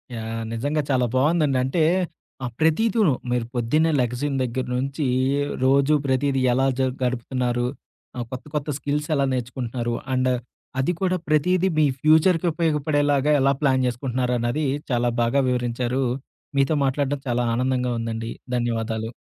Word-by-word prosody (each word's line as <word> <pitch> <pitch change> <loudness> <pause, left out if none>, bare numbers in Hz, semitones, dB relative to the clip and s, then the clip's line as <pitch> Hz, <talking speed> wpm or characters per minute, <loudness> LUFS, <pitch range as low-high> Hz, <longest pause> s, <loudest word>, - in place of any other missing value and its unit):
Yeah! 115 0 -4
నిజంగా 145 +6 0
చాలా 130 -2 +2
బాగుందండి. 145 0 +2
అంటే, 135 +6 0 0.6
ఆ - - -1
ప్రతీదీను 190 - +3 0.2
మీరు 120 -1 0
పొద్దున్న 150 +7 +2
లెగసిన 125 +4 -1
దగ్గర 125 +1 -2
నుంచి 140 +3 -2 0.6
రోజు 135 +3 +4
ప్రతీదీ 135 0 +1
ఎలా 135 +2 +2
జర్ 130 -1 +1
గడుపుతున్నారు? 125 0 -1 0.5
ఆహ్, 120 - -3
కొత్త 130 -1 -6
కొత్త 150 0 -2
స్కిల్స్ 145 +3 -2
ఎలా 140 -1 +2
నేర్చుకుంటున్నారు? 120 -1 -3 0.2
అండ్ 130 0 +2 0.5
అది 135 +6 +2
కూడా 185 -1 +1
ప్రతీదీ 180 +5 +2
మీ 155 - +5 0.2
ఫ్యూచర్‌కి 160 +3 +4
ఉపయోగపడేలాగా 150 -3 +1
ఎలా 135 +1 +4
ప్లాన్ 130 -2 +3
జేసుకుంటున్నారన్నది 125 +2 -1 0.3
చాలా 120 0 +2
బాగా 120 +4 +2
వివరించారు. 125 +1 -1 0.5
మీతో 135 +3 +3
మాట్లాడడం 140 +1 -1
చాలా 120 0 +1
ఆనందంగా 125 0 0
ఉందండి. 115 0 -4 0.3
ధన్యవాదాలు. 115 -2 -1
130 Hz, 130 wpm, -23 LUFS, 120-145 Hz, 0.6 s, మీ